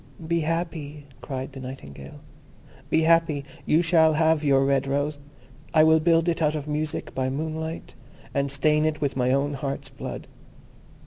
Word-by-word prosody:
"Be 170 0 +1
happy," 155 -3 -3 0.2
cried 135 0 -5
the 135 - -8
Nightingale, 70 - -9 0.7
"be 160 - +3
happy; 165 -3 +3 0.2
you 160 +3 +4
shall 160 -2 +4
have 160 0 +2
your 135 -2 +4
red 140 0 +1
rose. 145 +2 -1 0.6
I 155 - +7
will 160 0 +5
build 165 +1 +3
it 170 -1 0
out 155 0 +2
of 150 -1 -4
music 150 0 -3
by 130 0 -1
moonlight, 160 +3 -4 0.4
and 140 -1 0
stain 150 +3 +2
it 155 -1 0
with 145 -2 -1
my 125 -1 +1
own 140 +2 +1
heart's 140 0 -4
blood. 130 - -7
150 Hz, 165 wpm, -25 LUFS, 140-160 Hz, 0.7 s, I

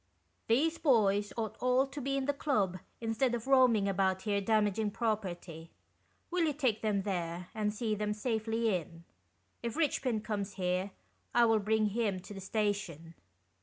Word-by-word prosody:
" 90 - -44
These 315 +8 +2
boys 205 -7 +3
ought 220 -2 -3
all 255 +1 +3
to 280 +1 -7
be 275 +1 -1
in 270 - -1
the 285 - +1
club 210 - 0 0.2
instead 235 +2 +1
of 230 - -5
roaming 255 -6 +4
about 190 -1 +1
here 205 -2 0
damaging 210 0 +1
pro 220 +1 +1
perty. 175 -5 -8 0.6
Will 355 -1 +2
you 305 - +1
take 255 -7 0
them 205 -3 0
there, 175 -2 -3
and 210 -1 0
see 215 +1 -2
them 210 0 -1
safely 225 0 0
in? 170 -1 -6 0.6
If 235 -1 -3
Eichpin 260 -8 0
comes 205 -2 -3
'here, 185 +1 -1 0.5
I 240 0 +6
will 225 -1 +4
bring 215 +1 +1
him 205 -3 -1
to 195 - -10
the 195 - -8
station." 195 -6 -2
215 Hz, 170 wpm, -32 LUFS, 195-235 Hz, 0.6 s, I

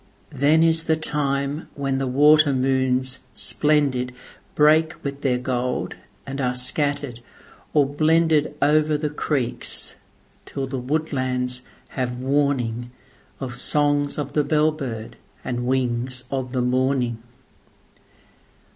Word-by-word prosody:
Then 150 +3 +3
is 165 0 +3
the 160 - +3
time 145 -1 -1
when 135 -1 -1
the 135 - -1
water 150 +2 +5
moons 130 0 +1 0.2
splendidBreak 150 +2 +1
with 140 0 -5
their 130 -3 +1
gold, 125 0 -2 0.3
and 135 +1 -4
are 125 -1 0
scattered 140 0 0 0.6
or 145 -2 +5
blendedOver 155 0 +2
the 150 -1 -2
creeks, 140 -5 -2 0.5
till 135 - -4
the 130 0 -4
woodlands 130 -3 -2 0.3
have 125 -2 -2
warningOf 130 -2 -3
songs 145 +2 +1
of 145 -1 -4
the 150 - +2
bell 155 +1 +2
bird 125 -8 -6 0.3
and 120 0 -2
wings 125 0 0
of 130 -2 -3
the 125 -2 0
morning. 125 -2 0
135 Hz, 110 wpm, -23 LUFS, 125-150 Hz, 0.6 s, water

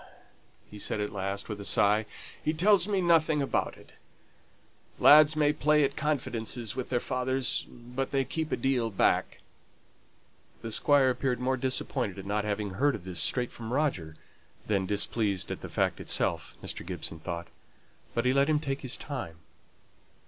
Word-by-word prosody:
he 105 - -9
said 105 - -2
at 105 0 -2
last, 100 0 -3
with 105 -2 -5
a - - -6
sigh. 105 +2 +3 0.4
"He 155 - 0
tells 190 +3 +4
me 200 -2 +1
nothing 165 -3 +3
about 140 - -1
it. - - -17 1.0
Lads 155 +1 +7
may 150 -1 +3
play 150 0 +3
at 140 0 0
confidences 120 -6 -2
with 130 -1 -4
their 125 - +1
fathers, 130 0 +1
but 125 +2 -5
they 135 -1 0
keep 160 +2 -3
a - - 0
deal 130 -4 0
back." 100 - +1 1.2
The 115 - -5
Squire 135 +2 +4
appeared 125 -1 -1
more 130 +1 0
disappointed 130 -4 -2
at 95 - -8
not 105 +1 -1
having 105 -1 -2
heard 135 +8 +1
of - - -9
this 90 -2 -4
straight 125 -2 +1
from 115 -1 -8
Roger 125 - -1 0.5
than 100 -3 0
displeased 100 -1 -1
at - - -5
the - - -7
fact - - 0
itself, - - -1
Mr. - - -4
Gibson 85 -2 -5
thought. 85 +1 -5 0.7
But 120 - 0
he 125 - +3
let 140 +2 +3
him 150 -1 +3
take 140 -2 -3
his 130 -2 -2
time. 130 - -6
125 Hz, 170 wpm, -29 LUFS, 105-145 Hz, 1.2 s, Lads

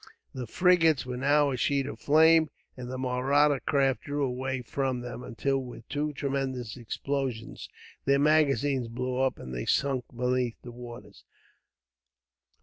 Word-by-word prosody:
The 125 -2 -5
frigates 165 - +3
were 125 -1 -4
now 145 +2 +3
a 130 - -2
sheet 140 +2 +1
of 145 - -7
flames, 160 +1 +5 0.3
and 125 -1 -7
the 130 - -4
Mahratta 135 +3 +2
craft 135 +1 +1
drew 145 0 -1
away 130 0 -3
from 130 +1 -2
them; 125 0 -7
until, 135 +3 -1
with 120 -3 -9
two 150 0 -1
tremendous 135 -4 -3
explosions, 130 0 -4 0.4
their 140 0 +4
magazines 145 -3 +2
blew 125 +2 -3
up 130 0 +1
and 65 - -8
they - - -3
sank 135 -3 +1
beneath 125 0 -1
the 120 - -8
waters. 120 0 -11
130 Hz, 145 wpm, -28 LUFS, 125-145 Hz, 0.4 s, flames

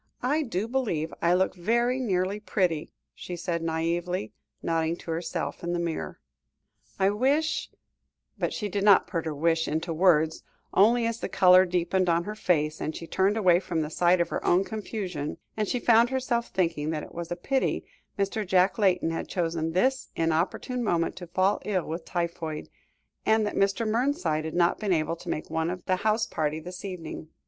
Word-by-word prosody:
"I 290 +5 +2
do 225 - -2
really - - -2
believe 180 -12 -1
I 170 +1 +4
look 190 +1 +2
very 235 +7 +1
nearly 195 -4 0
pretty," 180 -7 -1 0.2
she 180 - -7
said 170 -1 -2
naïvely, 165 -3 -1 0.3
nodding 165 0 0
to 170 - -7
herself 165 +1 -3
in 175 0 -1
the 175 - -1
mirror. 170 -2 -3 0.8
"I 195 0 +3
wish 280 +9 +1 0.3
" - - -52
but - - 0
she 210 - -3
did 200 0 -2
not 200 -2 +6
put 165 -2 -3
her 155 -2 -3
wish 165 +2 +1
into 160 +2 -2
words, 160 -2 +3 0.3
only, 230 +4 +5
as 230 0 -2
the - - -4
colour 185 0 +6
deepened 180 +1 +1
on 170 0 +2
her 210 - -5
face, 155 -7 0
and 155 - -3
she 165 - -6
turned 195 +5 +1
away 180 -5 +5
from 170 -4 -2
the 150 - -5
sight 175 +2 +3
of 170 - +1
her - - -3
own 180 +2 +3
confusion, 195 -8 -4 0.3
she 245 - -1
found 235 0 +5
herself 255 -3 -1
thinking 165 -5 -1
that 155 -2 -2
it - - -11
was 170 0 -6
a - - 0
pity 265 +9 -1 0.3
Mr. 200 +2 -1
Jack 185 +2 +2
Layton 180 -5 +2
had 165 - -3
chosen 165 -2 -1
this 260 +9 +1
inopportune 165 +10 0
moment 170 -6 0
to 175 0 -8
fall 185 +4 +1
ill 190 -4 -1
with 165 +1 -5
typhoid, 170 -3 -3 0.5
and 220 0 +3
that 205 - -2
Mr. 200 +3 +1
Mernside 215 - 0
had 160 - -5
not 175 0 +3
been 205 -4 +1
able 160 0 0
to - - -9
make 155 - -4
one 160 0 0
of 180 0 -5
the 185 - +1
house 215 +3 +1
party 155 -4 -2
this 180 +3 -9
evening. 165 -5 -7
180 Hz, 190 wpm, -27 LUFS, 165-210 Hz, 0.8 s, not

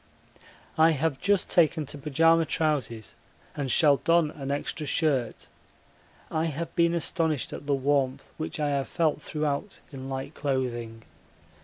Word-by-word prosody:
I 160 +1 +6
have 150 -1 -1
just 200 -1 +2
taken 160 -2 +3
to 140 - -7
pyjama 165 +3 +3
trousers 135 -8 -1 0.4
and 140 -2 -3
shall 145 0 +5
don 165 -1 +2
an 140 -3 -7
extra 145 +2 -3
shirt 135 -7 0 0.8
I 160 +1 0
have 165 +1 -4
been 170 0 +3
astonished 160 -3 -1
at 145 - -8
the 140 - +3
warmth 135 -1 0
which 155 0 -5
I 150 -1 +1
have 140 -1 -1
felt 160 -3 0
throughout 150 +6 -3
in 135 -1 -7
light 135 +2 -5
clothing. 120 -6 -3
150 Hz, 145 wpm, -27 LUFS, 135-160 Hz, 0.8 s, I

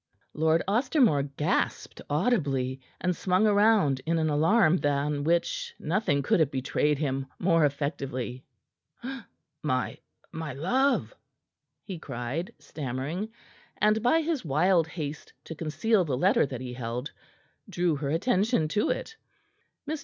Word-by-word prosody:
Lord 160 +2 +2
Ostermore 235 - +3 0.2
gasped 150 - -1
audibly 140 - 0 0.2
and 180 -1 0
swung 185 +4 +2
round 205 -10 +4
in 165 0 +2
an 155 -1 +1
alarm 165 +4 +4
than 145 -1 0
which 470 - 0
nothing 160 -6 0
could 135 - +2
have 155 -4 +3
betrayed 140 +2 0
him 135 -2 -2
more 165 -3 +3
effectively. 135 -3 -3 1.2
"My 130 -4 -1 0.3
my 160 -3 -5
love!" 255 - +1 0.7
he 185 -5 -7
cried, 135 - -4
stammering, 145 - -4 0.5
and 215 +1 +3
by 285 +8 +3
his 315 -4 -1
wild 165 +3 +3
haste 155 -3 -6
to - - -7
conceal 180 +7 +1
the 140 -6 -2
letter 195 - +3
that 130 -3 -6
he 125 -1 -6
held, 125 +3 -4 0.6
drew 175 -4 +1
her 140 -1 -3
attention 190 - +1
to 210 +6 +1
it. 450 - -3 0.7
Mr. 310 +1 -2
160 Hz, 130 wpm, -28 LUFS, 140-205 Hz, 1.2 s, round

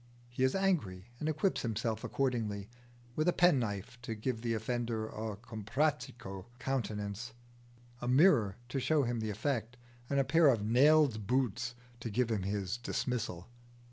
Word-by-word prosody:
He 120 +2 -2
is 130 - +3
angry 120 - 0
and 155 - -1
equips 155 +5 +1
himself 115 -1 -2
accordingly 110 -7 -1 0.5
with 155 +2 +1
a 175 - +4
penknife 125 - +1
to 115 -1 -4
give 110 +1 -2
the 115 -1 0
offender 115 0 -2
a 110 -1 -5
comprachico 115 -2 -2
countenance, 115 -3 -3 0.7
a 120 - -3
mirror 125 - +5
to 135 - -1
show 145 +3 +2
him 120 -1 -1
the 110 -1 -2
effect, 115 +2 -2 0.3
and 140 - +2
a - - +4
pair 155 +4 +5
of 115 -6 +3
nailed 125 -2 +4
boots 125 -1 0 0.2
to 115 - -4
give 115 +2 +1
him 105 -3 0
his 100 +2 -2
dismissal. 120 -7 -3
120 Hz, 150 wpm, -33 LUFS, 110-135 Hz, 0.7 s, mirror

